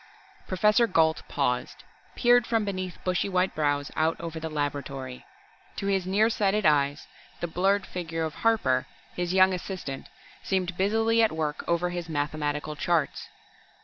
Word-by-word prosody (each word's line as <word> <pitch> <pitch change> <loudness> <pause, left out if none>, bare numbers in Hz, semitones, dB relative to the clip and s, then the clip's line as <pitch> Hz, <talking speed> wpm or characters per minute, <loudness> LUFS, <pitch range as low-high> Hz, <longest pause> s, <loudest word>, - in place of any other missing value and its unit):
Professor 210 +5 +3
Gault 160 -5 +2
paused, 125 -3 -2 0.3
peered 245 -1 +4
from 225 -2 +1
beneath 185 -2 -4
bushy 185 +2 0
white 185 0 +1
brows 145 -2 0
out 160 +1 +1
over 165 -1 -5
the 160 0 -4
laboratory. 140 -3 -4 0.5
To - - -4
his 195 -2 0
near 205 +4 +3
sighted 210 -1 +1
eyes 145 -1 +2 0.3
the - - -2
blurred 195 +4 +1
figure 165 -2 -4
of 160 -1 -3
Harper, 140 - +2 0.3
his 175 0 -2
young 190 0 +5
assistant, 180 -7 -5 0.3
seemed 185 -2 -1
busily 225 +4 +2
at 225 - +4
work 155 -2 -2
over 170 +1 +1
his 175 -1 -5
mathematical 150 0 -2
charts. 160 0 -1
175 Hz, 145 wpm, -27 LUFS, 150-195 Hz, 0.5 s, young